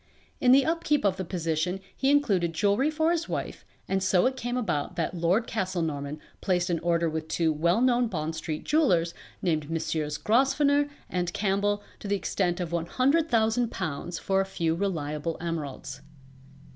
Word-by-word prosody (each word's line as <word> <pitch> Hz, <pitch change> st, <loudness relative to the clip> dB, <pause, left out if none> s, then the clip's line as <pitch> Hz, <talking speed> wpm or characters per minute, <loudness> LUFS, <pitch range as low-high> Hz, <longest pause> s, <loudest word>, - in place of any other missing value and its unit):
In 250 Hz, -, +4 dB
the 270 Hz, +1 st, +6 dB
upkeep 315 Hz, -5 st, +1 dB
of 190 Hz, -2 st, +2 dB
the 190 Hz, -, -2 dB
position 165 Hz, +1 st, -1 dB, 0.2 s
he 270 Hz, -, +1 dB
included 200 Hz, -13 st, +2 dB
jewelry 205 Hz, -, +2 dB
for 315 Hz, +1 st, +1 dB
his 340 Hz, 0 st, -1 dB
wife -, -, -4 dB, 0.2 s
and 195 Hz, 0 st, 0 dB
so 185 Hz, -1 st, +3 dB
it 260 Hz, +1 st, +1 dB
came 245 Hz, 0 st, -3 dB
about 180 Hz, -9 st, -1 dB
that 170 Hz, 0 st, -1 dB
Lord 180 Hz, +6 st, +1 dB
Castlenorman 160 Hz, -9 st, -2 dB, 0.2 s
placed 180 Hz, -1 st, +1 dB
an 170 Hz, -, 0 dB
order 170 Hz, 0 st, +1 dB
with 160 Hz, 0 st, -3 dB
two 160 Hz, -1 st, +1 dB
well 170 Hz, +8 st, +2 dB
known 245 Hz, -1 st, +3 dB
Bond 160 Hz, -5 st, -3 dB
street 155 Hz, -1 st, -4 dB
jewellers 180 Hz, -, +2 dB, 0.3 s
named 155 Hz, -4 st, 0 dB
Messrs. 155 Hz, -2 st, -2 dB
Grosvenor 280 Hz, -, +3 dB, 0.2 s
and 180 Hz, -1 st, -2 dB
Campbell 205 Hz, +1 st, 0 dB, 0.2 s
to -, -, -7 dB
the 200 Hz, -, +1 dB
extent 185 Hz, -2 st, -1 dB
of 175 Hz, -2 st, -3 dB
£100,000 220 Hz, -, 0 dB
for 195 Hz, 0 st, +1 dB
a -, -, -1 dB
few 165 Hz, -4 st, 0 dB
reliable 165 Hz, -4 st, -2 dB
emeralds. 160 Hz, -5 st, -5 dB
185 Hz, 160 wpm, -27 LUFS, 165-240 Hz, 0.3 s, the